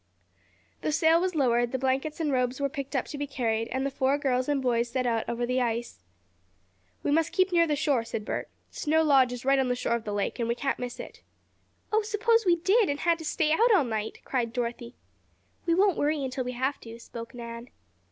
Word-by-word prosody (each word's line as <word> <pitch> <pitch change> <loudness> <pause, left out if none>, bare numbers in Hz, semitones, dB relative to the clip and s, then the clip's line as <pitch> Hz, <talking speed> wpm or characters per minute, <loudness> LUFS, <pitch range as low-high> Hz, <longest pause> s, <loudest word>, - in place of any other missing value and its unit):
The - - -1
sail 325 +2 +4
was 370 -1 -1
lowered, 240 -4 +2
the 260 - -1
blankets 270 +4 -1
and 310 -3 0
robes 250 0 0
were 280 0 0
picked 275 0 -6
up 260 - +1
to 290 - -7
be 290 - -2
carried, 230 -4 -1
and 260 +3 -2
the 275 - -1
four 270 +1 +1
girls 255 -2 0
and 290 -1 +2
boys 240 -2 +1
set 255 +1 -1
out 230 -2 0
over 235 +1 -1
the 250 +1 0
ice. 235 - -2 1.0
"We - - 0
must 320 +2 +2
keep 375 0 +2
near 335 -1 +4
the 300 - +1
shore," 280 -5 +1
said 225 -2 -5
Bert, - - -3 0.2
"Snow 320 +1 +1
Lodge 270 -5 +4
is 245 0 -6
right 275 0 +4
on 265 - +1
the 250 - +1
shore 245 - -1
of 235 -1 -1
the 210 - -3
lake, 205 +4 -2
and 230 - 0
we 235 - +1
can't 270 +2 -2
miss 245 -1 -5
it." - - -9 0.7
"Oh, 435 - +4
suppose 440 +1 +1
we 345 - +6
did, 390 +4 +3
and 285 +1 -2
had 340 -1 +2
to 320 - -7
stay 310 0 +1
out 460 +9 +4
all 345 - +4
night?" 220 -3 -4
cried 240 -4 -1
Dorothy. 240 0 -4 0.7
"We 335 - +3
won't 385 -1 +3
worry 295 -1 +1
until 255 0 -3
we 250 - -3
have 260 +3 -1
to," 230 0 -10
spoke 230 0 -9
Nan. 235 0 -8
265 Hz, 230 wpm, -27 LUFS, 240-310 Hz, 1.0 s, we